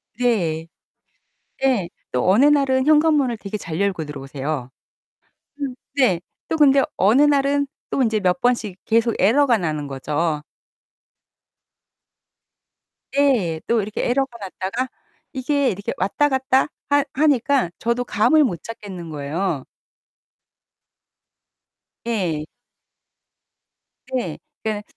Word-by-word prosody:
네. 180 -10 0 1.0
예 240 -10 +2 0.2
또 125 +5 0
어느 230 +9 +5
날은 275 -2 +3
현관문을 300 -5 +4
되게 205 0 -6
잘 165 -4 -5
열고 200 -5 0
들어오세요. 135 -1 -5 0.9
음 270 -3 -3 0.2
네. 250 -11 +3 0.3
또 320 - -1
근데 280 -2 +6
어느 215 +8 +4
날은 285 -1 +3 0.2
또 - - +1
인제 220 -3 +2
몇 180 -3 +1
번씩 230 -6 0
계속 230 +1 +2
에러가 245 +4 +4
나는 155 -4 -2
거죠. 150 +3 -2 2.7
예 230 - +2
또 230 -1 +2
이렇게 210 +1 -3
에러가 265 -1 0
났다가 200 +5 -4 0.4
이게 275 +1 +1
이렇게 200 +1 -3
왔다 200 +10 +1
갔다 265 0 +2 0.2
하 285 0 +4
하니까 280 - +2
저도 235 +1 0
감을 245 +7 +3
못 175 - -2
잡겠는 195 -7 -8
거예요. 150 +1 -3 2.4
예. 180 -10 -1 1.7
네. 185 -12 -2 0.3
그러니까는 215 -1 -2
225 Hz, 210 characters per minute, -21 LUFS, 175-270 Hz, 2.7 s, 근데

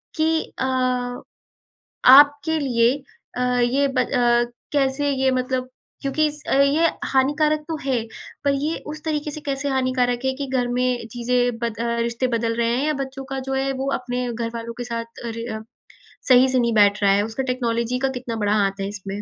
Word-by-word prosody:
कि 320 0 +2 0.2
अ, 260 - 0 1.5
आपके 290 +3 +6
लिए 240 -3 +3 0.4
अ, - - -2 0.2
ये 260 +4 +2
ब 265 - -3
अ, 240 -1 +2 0.3
कैसे 285 0 +1
ये 265 -1 +2
मतलब 255 0 -1 0.3
क्योंकि 300 +3 +1
स 295 0 -14
ये 280 +4 +4 0.2
हानिकारक 300 +3 +2
तो 325 - -2
है, 260 -4 0 0.4
पर 280 - +3
ये 295 +4 -1
उस 305 0 -7
तरीके 300 -1 -2
से 305 - -7
कैसे 280 0 -2
हानिकारक 255 -2 +1
है 265 - +2
कि 280 - -2
घर 255 -2 0
में 245 -1 0
चीज़ें 245 0 0
बद 230 -2 -3
अ, - - 0 0.2
रिश्ते 235 +2 -1
बदल 230 0 0
रहे 235 -1 +1
हैं, 275 +4 0
या 305 - +2
बच्चों 270 0 -7
का 270 - -3
जो 270 - -1
है, 270 0 0
वो 270 +1 -3
अपने 250 0 -3
घरवालों 230 0 -4
के 245 - -3
साथ 230 -1 -6
रे 230 0 -5
अ, 220 - -6 0.7
सही 255 0 +7
से 260 0 +2
नहीं 235 -1 +1
बैठ 205 -1 +4
रहा 200 - +5
है? 205 - +2
उसका 225 +4 -4
टेक्नॉलॉजी 245 -1 -1
का 270 - +1
कितना 245 -2 -5
बड़ा 205 - +2
हाथ 195 -1 0
है 195 - -2
इसमें? 200 0 -6
255 Hz, 190 wpm, -22 LUFS, 235-275 Hz, 1.5 s, सही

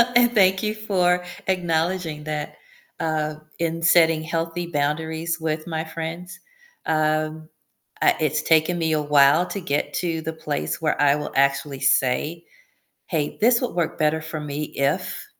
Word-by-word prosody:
and 240 0 +5
thank 190 -2 +4
you 215 0 -1
for 180 -4 +1 0.2
acknowledging 170 -3 -1
that, 150 -1 -4 0.4
uh, 155 -1 -1 0.2
in 165 0 -2
setting 165 -2 +4
healthy 165 +1 -3
boundaries 160 +2 -2
with 155 -1 -2
my 160 -2 -3
friends. 165 +3 -6 0.5
Um, 155 0 0 0.5
uh - - +5
it's - - +1
taken 160 +2 +3
me 160 -1 0
a 155 -1 +1
while 145 +3 +5
to 200 - -4
get 145 -4 -2
to 165 -2 -2
the 160 +1 -4
place 75 - -3
where 155 -2 0
I 145 0 +4
will 150 0 -5
actually 140 0 +1
say, 140 +5 +1 0.6
"Hey, 155 -4 -2
this 235 +3 +4
would 250 - -2
work 170 -2 -1
better 155 +1 +2
for 160 0 -6
me 150 0 -4
if" 140 0 -1
160 Hz, 150 wpm, -23 LUFS, 150-175 Hz, 0.6 s, and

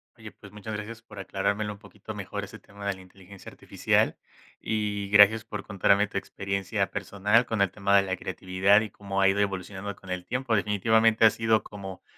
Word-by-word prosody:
Oye, - - -11
pues 100 - -15
muchas 105 +1 -8
gracias 110 +2 -7
por 105 -2 -15
aclarármelo 100 +2 -2
un 100 - -15
poquito 105 0 -10
mejor 100 0 -5
ese 100 +2 -10
tema 100 0 -12
de 100 - 0
la 95 - -13
inteligencia 95 +1 -14
artificial, - - 0 0.5
y, 105 -2 -2
gracias 105 +2 +6
por 105 - -7
contarme 100 0 +3
tu 100 - -3
experiencia 100 +1 -3
personal 100 +4 +1
con 110 -3 -1
el 95 - -1
tema 100 0 +1
de 100 - +4
la 95 -1 -2
creatividad 95 +2 +2
y 110 - -5
cómo 100 -1 -3
ha 95 - +5
ido 95 +1 +2
evolucionando 100 0 -3
con 95 -1 -11
el 90 -1 -3
tiempo, 125 -2 -1
definitivamente 110 +2 +3
ha 110 - +7
sido 110 -1 +1
como, 95 -2 -9
100 Hz, 195 wpm, -27 LUFS, 95-105 Hz, 0.5 s, ha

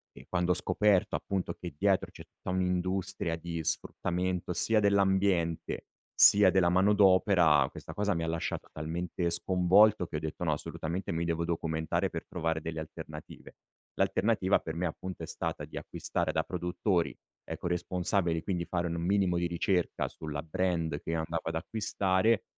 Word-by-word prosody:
e 65 - -13
quando 90 0 0
ho - - +5
scoperto, 105 0 +2
appunto, 95 -2 -2
che 85 -4 -8
dietro 100 +2 +2
c'è - - -11
tutta - - -11
un'industria 95 -1 -1
di 85 0 -5
sfruttamento 90 +3 -1
sia 110 +4 +2
dell'ambiente, 95 -4 +1 0.3
sia 100 -2 +7
della 90 -2 +3
manodopera 95 -5 +4
questa - - -9
cosa 105 0 +1
mi 85 - -2
ha - - -2
lasciato 80 0 -3
talmente 85 +2 -3
sconvolto 95 +3 +4
che 80 - -5
ho - - -2
detto: 80 +3 -5
"No 85 - +1
assolutamente 85 +4 -4
mi 85 +1 -1
devo 85 0 -1
documentare 80 -1 -1
per - - -6
trovare 80 -1 -2
delle 80 0 -5
alternative." 75 0 -10 0.4
L'alternativa 100 -2 +2
per 80 - -6
me 90 +2 -1
appunto 90 +1 -5
è - - -3
stata - - -4
di - - -13
acquistare - - -3
da - - 0
produttori 90 0 -1 0.3
eco - - -7
responsabili, 90 -1 0
quindi 90 -3 -2
fare 85 0 -1
un 85 - -3
minimo 95 -1 +2
di 85 0 0
ricerca 85 +1 0
sulla 75 -2 -6
brand 80 -2 -1
che 80 - -4
andavo 80 0 -2
ad 80 - -4
acquistare, 100 +3 +1
90 Hz, 160 wpm, -30 LUFS, 80-95 Hz, 0.4 s, sia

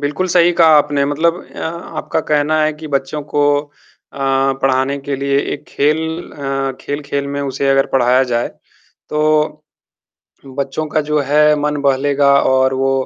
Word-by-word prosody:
बिल्कुल 150 +6 -2
सही 175 0 +4
कहा 160 -2 +7
आपने 145 -1 +1
मतलब 160 +4 +1 0.2
अ, - - -10
आपका 160 -1 -4
कहना 150 +1 +1
है 155 - +1
कि 155 +1 -10
बच्चों 140 +1 -2
को 145 - +2 0.2
अ, 145 - -19 0.9
पढ़ाने 135 +1 +1
के 140 0 -4
लिए 140 0 0 0.2
एक 145 +1 -11
खेल 150 +2 +1 0.4
अ, 135 -1 -3
खेल-खेल 140 -1 -4
में 140 0 -3
उसे 135 0 -2
अगर 135 0 +3
पढ़ाया 125 0 +3
जाए, 120 0 0 0.6
तो 155 0 0 0.9
बच्चों 140 +3 -3
का 155 - 0
जो 150 - +2
है 150 +2 +3
मन 150 0 -1
बहलेगा 140 +1 +2
और 130 0 +2
वो 135 0 +1
145 Hz, 155 wpm, -16 LUFS, 135-150 Hz, 0.9 s, कहा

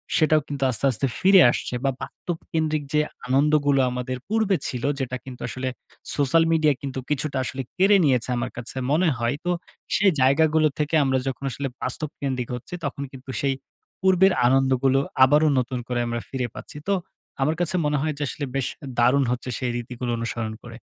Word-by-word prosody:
সেটাও 155 -1 +4
কিন্তু 140 -2 -3
আস্তে, 125 +2 -1
আস্তে 130 +3 -1
ফিরে 190 0 +7
আসছে - - -4
বা, 135 - +2
বাস্তবকেন্দ্রিক 160 -3 -3
যে 150 - +4 0.3
আনন্দগুলো 145 +1 +3
আমাদের 125 +1 -3
পূর্বে 215 -1 +2
ছিল, 125 -2 -4 0.2
যেটা 130 -1 -2
কিন্তু 130 -2 -9
আসলে 130 0 -3 0.5
সোশ্যাল 145 +3 +3
মিডিয়া 155 -2 +4
কিন্তু 135 -1 -4
কিছুটা 150 -1 -1
আসলে 130 +2 -4 0.2
কেড়ে 195 +2 +6
নিয়েছে 125 -4 +2
আমার 120 - -3
কাছে 125 +2 -5
মনে 170 +5 +3
হয়। 120 +2 0
তো 180 - +1 0.4
সেই 195 -1 +4
জায়গাগুলো 155 +4 +4
থেকে 150 +1 0
আমরা 130 -1 +2
যখন 135 +1 -4
আসলে 140 +3 -3
বাস্তবকেন্দ্রিক 130 -2 -3
হচ্ছি, 125 - -10
তখন 140 0 -3
কিন্তু 135 0 -12
সেই 140 -1 +1 0.5
পূর্বের 190 0 +5
আনন্দগুলো 135 +1 +3 0.2
আবারো 150 +4 +5
নতুন 125 0 -2
করে 125 -1 -1
আমরা 120 0 -2
ফিরে 130 -2 -2
পাচ্ছি। - - -9
তো 200 - +3 0.5
আমার 155 +4 +2
কাছে 175 +1 +1
মনে 150 0 +1
হয় 155 +1 0
যে 150 - -2
আসলে 145 - -4
বেশ 135 -2 0 0.3
দারুণ 125 +4 +4
হচ্ছে 125 +1 -3
সেই 125 -2 -1
রীতিগুলো 120 0 -4
অনুসরণ 115 -1 -3
করে। 115 -1 -9
135 Hz, 175 wpm, -24 LUFS, 125-155 Hz, 0.5 s, ফিরে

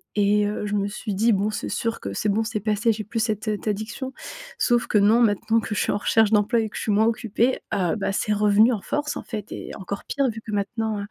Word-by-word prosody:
Et 205 0 +3
heu, 210 0 -3
je 205 - -3
me 200 0 0
suis 210 0 -5
dit: 225 +4 +3
«Bon, 200 +2 +1
c'est - - -4
sûr 230 0 -2
que 100 - -5
c'est 210 - -1
bon, 220 +3 +1
c'est 220 -1 -3
passé, 215 +2 +1
j'ai 215 0 -3
plus 225 +3 -4
cette, 215 -1 -1
heu, 210 -1 0
addiction». 220 +5 -4 0.5
Sauf 240 -1 +2
que 210 - +2
non, 215 +4 +5
maintenant 225 +1 +2
que 215 - -4
je - - 0
suis - - +1
en - - 0
recherche 220 +1 +3
d'emploi 220 +3 +3
et 220 - -2
que - - -14
je - - -3
suis 215 - -1
moins 215 +2 +4
occupée, 230 +2 +1 0.2
heu 180 0 +1
bah, 195 -2 -1
c'est 210 +2 0
revenu 210 +3 +4
en 205 - -3
force 295 0 -2
en - - -6
fait. 215 -4 -6
Et - - -7
encore 200 0 -6
pire 275 -1 0
vu 225 0 -6
que 220 - -8
maintenant 210 +1 -2
heu, 200 - -4
215 Hz, 270 wpm, -24 LUFS, 205-225 Hz, 0.5 s, non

